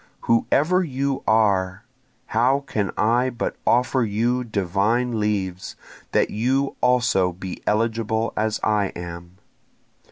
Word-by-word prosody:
Whoever 155 +10 +2
you 140 -3 -2
are! 100 -3 +2 0.4
how 130 +5 +2
can 105 -7 -2
I 120 +5 +2
but 120 -1 -3
offer 125 +1 +3
you 115 +4 0
divine 110 +3 0
leaves, 95 -4 -2 0.4
that - - +2
you 130 +5 0
also 120 -7 +2
be 90 +1 -8
eligible 110 0 0
as 110 0 -1
I 105 -2 +2
am? 85 +1 -8
110 Hz, 115 wpm, -23 LUFS, 100-125 Hz, 0.4 s, offer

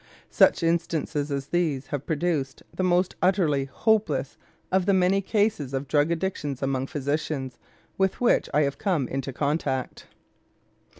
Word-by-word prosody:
Such - - +4
instances 165 -3 0
as 140 0 -3
these 155 -6 0
have 145 0 -5
produced 155 -4 -1
the - - -2
most 180 0 +2
utterly 170 -7 +2
hopeless 150 - 0 0.4
of 190 0 +2
the 200 - +4
many 190 +1 +3
cases 205 - 0
of 135 +1 -3
drug 145 +2 +2
addictions 160 -6 -2
among 135 -1 -1
physicians 145 -2 -3 0.4
with 190 -1 +1
which 245 - +2
I 150 - +3
have 140 0 -2
come 175 - 0
into 135 +1 -3
contact. 140 -1 -2
150 Hz, 140 wpm, -26 LUFS, 135-180 Hz, 0.4 s, Such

